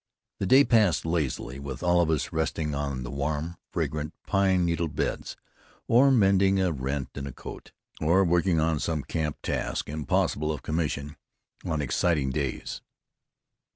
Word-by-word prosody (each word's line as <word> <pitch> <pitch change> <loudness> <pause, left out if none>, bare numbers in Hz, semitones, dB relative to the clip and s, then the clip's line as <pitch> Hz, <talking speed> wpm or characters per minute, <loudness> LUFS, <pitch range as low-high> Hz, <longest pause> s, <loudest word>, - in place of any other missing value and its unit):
The 95 - -1
day 135 +7 +7
passed 110 - +3
lazily, 75 -5 -2
with 70 -2 -6
all 90 0 +4
of 85 - +1
us 80 -3 -1
resting 80 -1 -1
on 70 -2 -3
the - - -6
warm, 75 +4 -2
fragrant 75 +1 -2
pine 95 -3 +2
needle 85 0 0
beds, 75 -1 -3 0.5
or 130 +4 +6
mending 95 -5 +4
a 95 -2 +2
rent 70 -1 -3
in 70 -1 -5
a - - -5
coat, - - -10 0.3
or 85 +5 +4
working 85 0 +2
on 80 -1 +1
some 75 -1 -1
camp 75 +2 -2
task - - -2
impossible 75 0 0
of 75 -4 -5
commission 75 -2 -2 0.5
on 75 -2 -1
exciting 70 0 +1
days. 70 -1 -3
80 Hz, 155 wpm, -27 LUFS, 70-90 Hz, 0.5 s, day